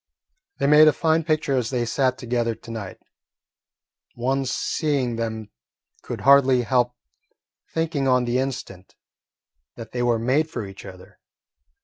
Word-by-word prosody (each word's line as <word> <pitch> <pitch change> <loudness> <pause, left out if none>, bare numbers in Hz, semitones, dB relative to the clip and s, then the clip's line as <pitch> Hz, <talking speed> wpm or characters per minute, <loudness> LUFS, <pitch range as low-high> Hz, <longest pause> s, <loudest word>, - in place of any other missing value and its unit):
They - - -1
made 150 +2 +7
a 155 - +5
fine 160 +2 +1
picture 155 -3 0
as 125 -3 -1
they 125 -2 -1
sat 130 +2 0
together 120 -1 -1
to 115 - -12
night. 105 -5 -7 1.2
One 135 +2 -1
seeing 130 -1 -1
them 110 -2 -4 0.5
could - - -6
hardly 135 -2 +5
help 125 +1 +1 0.8
thinking 160 -4 -1
on 125 -1 +3
the 120 +1 0
instant 125 -8 -6 0.8
that 115 -2 -10
they 120 - -3
were 120 -1 +2
made 135 +7 +1
for 120 -9 -5
each 95 +1 -11
other. 95 -1 -13
125 Hz, 140 wpm, -23 LUFS, 115-140 Hz, 1.2 s, made